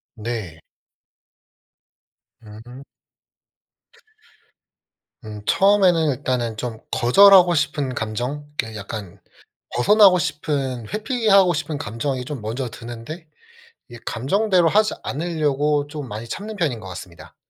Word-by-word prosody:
네. 110 Hz, -7 st, -5 dB, 1.8 s
음. 115 Hz, +5 st, -12 dB, 2.4 s
음 105 Hz, -1 st, -8 dB
처음에는 185 Hz, -6 st, +3 dB
일단은 125 Hz, -4 st, -2 dB
좀 115 Hz, -1 st, -5 dB
거절하고 180 Hz, +7 st, +6 dB
싶은 145 Hz, -3 st, -1 dB
감정, 125 Hz, +6 st, -4 dB, 0.2 s
이렇게 110 Hz, -1 st, -8 dB
약간 100 Hz, -2 st, -8 dB, 0.6 s
벗어나고 195 Hz, -, +6 dB
싶은 140 Hz, -7 st, -3 dB
회피하고 210 Hz, -5 st, +3 dB
싶은 155 Hz, -1 st, -3 dB
감정이 125 Hz, +2 st, -4 dB
좀 140 Hz, -4 st, -6 dB
먼저 120 Hz, +4 st, -4 dB
드는데 120 Hz, +8 st, -9 dB, 0.6 s
이 120 Hz, -, -10 dB
감정대로 180 Hz, -, +1 dB
하지 215 Hz, +4 st, +2 dB
않으려고 150 Hz, -2 st, -1 dB
좀 145 Hz, -2 st, -7 dB
많이 110 Hz, +1 st, -7 dB
참는 215 Hz, -, -6 dB
편인 155 Hz, -, -1 dB
것 95 Hz, -, -10 dB
같습니다. 85 Hz, -3 st, -11 dB
140 Hz, 235 characters per minute, -21 LUFS, 115-170 Hz, 2.4 s, 거절하고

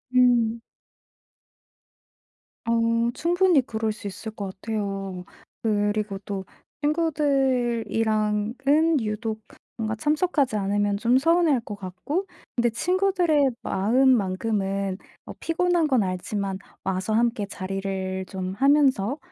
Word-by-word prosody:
음. 235 Hz, -2 st, +4 dB, 2.1 s
어 230 Hz, 0 st, +2 dB
충분히 350 Hz, -2 st, +3 dB
그럴 220 Hz, -3 st, -2 dB
수 215 Hz, -, -10 dB
있을 200 Hz, +3 st, -6 dB
것 200 Hz, -3 st, -5 dB
같아요. 195 Hz, -4 st, -4 dB, 0.4 s
그리고 205 Hz, -2 st, 0 dB
또 195 Hz, -2 st, -4 dB, 0.4 s
친구들이랑은 240 Hz, -8 st, +1 dB, 0.5 s
유독 220 Hz, 0 st, -3 dB, 0.4 s
뭔가 220 Hz, -1 st, -2 dB
참석하지 295 Hz, 0 st, +1 dB
않으면 205 Hz, 0 st, 0 dB
좀 240 Hz, +4 st, +3 dB
서운해할 330 Hz, -2 st, +3 dB
것 210 Hz, -2 st, -7 dB
같고. 200 Hz, -, -4 dB, 0.3 s
근데 240 Hz, -1 st, +2 dB
친구들의 350 Hz, -, +2 dB
마음만큼은 200 Hz, -4 st, +1 dB, 0.3 s
뭐 -, -, -9 dB
피곤한 340 Hz, -1 st, +1 dB
건 255 Hz, -6 st, +3 dB
알지만 190 Hz, +1 st, -3 dB, 0.2 s
와서 190 Hz, +2 st, -1 dB
함께 230 Hz, -2 st, +1 dB
자리를 190 Hz, -1 st, -4 dB
좀 185 Hz, -1 st, -4 dB
하면서 270 Hz, -2 st, +3 dB
225 Hz, 225 characters per minute, -25 LUFS, 200-270 Hz, 2.1 s, 음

